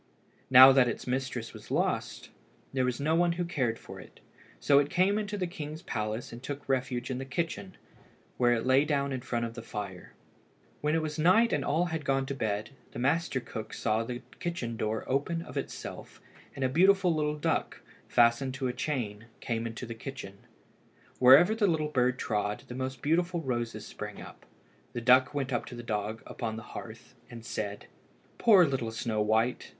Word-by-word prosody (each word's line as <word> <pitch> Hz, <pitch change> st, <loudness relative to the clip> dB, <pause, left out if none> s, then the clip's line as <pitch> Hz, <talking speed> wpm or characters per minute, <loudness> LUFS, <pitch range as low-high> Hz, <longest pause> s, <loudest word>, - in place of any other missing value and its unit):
Now 130 Hz, +1 st, +10 dB
that 130 Hz, -2 st, +5 dB
its 120 Hz, -, -4 dB
mistress 125 Hz, -2 st, -3 dB
was -, -, -12 dB
lost, -, -, -1 dB, 0.4 s
there 130 Hz, -1 st, +1 dB
was 125 Hz, -1 st, -1 dB
no 155 Hz, +3 st, +1 dB
one 170 Hz, +1 st, +3 dB
who 175 Hz, +1 st, -2 dB
cared 130 Hz, -9 st, -1 dB
for -, -, -11 dB
it, -, -, -14 dB, 0.4 s
so 140 Hz, -1 st, +5 dB
it 145 Hz, 0 st, 0 dB
came 195 Hz, +4 st, +2 dB
into 210 Hz, 0 st, -3 dB
the 185 Hz, -, -1 dB
king's 155 Hz, -1 st, -7 dB
palace 110 Hz, -, -3 dB
and 120 Hz, -, -9 dB
took 145 Hz, +2 st, -6 dB
refuge 130 Hz, -1 st, -1 dB
in 130 Hz, -, -3 dB
the -, -, -4 dB
kitchen, 170 Hz, +7 st, -4 dB, 0.6 s
where 120 Hz, -1 st, +4 dB
it 115 Hz, 0 st, -1 dB
lay 130 Hz, +2 st, +5 dB
down 140 Hz, -2 st, 0 dB
in 130 Hz, -, -3 dB
front 120 Hz, -1 st, -2 dB
of 115 Hz, -, -6 dB
the 115 Hz, -, -7 dB
fire. 100 Hz, -5 st, -7 dB, 0.7 s
When 150 Hz, +1 st, +1 dB
it 165 Hz, -, +1 dB
was 155 Hz, 0 st, -4 dB
night 205 Hz, +9 st, +4 dB
and -, -, +1 dB
all 160 Hz, +5 st, +1 dB
had 160 Hz, -2 st, -2 dB
gone 135 Hz, -1 st, +1 dB
to 140 Hz, -, -4 dB
bed, 110 Hz, -4 st, -2 dB, 0.2 s
the -, -, -7 dB
master 140 Hz, +3 st, +1 dB
cook 110 Hz, -3 st, -7 dB
saw 110 Hz, 0 st, 0 dB
the 120 Hz, +1 st, -6 dB, 0.2 s
kitchen 150 Hz, -10 st, -3 dB
door 110 Hz, 0 st, -2 dB
open 145 Hz, +5 st, -1 dB
of -, -, -11 dB
itself -, -, -6 dB, 0.4 s
and 135 Hz, -, -1 dB
a -, -, +4 dB
beautiful 185 Hz, +5 st, +4 dB
little 150 Hz, -1 st, -1 dB
duck, 150 Hz, -, -1 dB, 0.3 s
fastened 120 Hz, +3 st, +3 dB
to 135 Hz, -1 st, -3 dB
a 125 Hz, -, -2 dB
chain, 120 Hz, -6 st, -3 dB
came 115 Hz, -2 st, -2 dB
into 115 Hz, +2 st, -6 dB
the 115 Hz, -, -6 dB
kitchen. 115 Hz, -5 st, -8 dB, 0.8 s
Wherever 140 Hz, +11 st, +8 dB
the 220 Hz, -2 st, +2 dB
little 155 Hz, -3 st, 0 dB
bird 130 Hz, -3 st, +1 dB
trod 105 Hz, -1 st, -2 dB
the -, -, -7 dB
most 130 Hz, 0 st, -5 dB
beautiful 170 Hz, +3 st, +1 dB
roses 120 Hz, -5 st, -3 dB
sprang -, -, -7 dB
up. -, -, -12 dB, 0.5 s
The 120 Hz, -, -3 dB
duck 130 Hz, +3 st, +5 dB
went 135 Hz, -2 st, -2 dB
up 120 Hz, -, -1 dB
to 125 Hz, -, -8 dB
the 120 Hz, -, -7 dB
dog 110 Hz, 0 st, -3 dB
upon 110 Hz, -2 st, -4 dB
the 110 Hz, -, -7 dB
hearth, 115 Hz, +2 st, -9 dB, 0.2 s
and 115 Hz, -1 st, -10 dB
said 105 Hz, -3 st, -4 dB, 0.5 s
"Poor 200 Hz, -6 st, +7 dB
little 135 Hz, -6 st, -1 dB
Snow 110 Hz, -1 st, -2 dB
white! 110 Hz, +3 st, +1 dB
130 Hz, 195 wpm, -29 LUFS, 115-150 Hz, 0.8 s, Now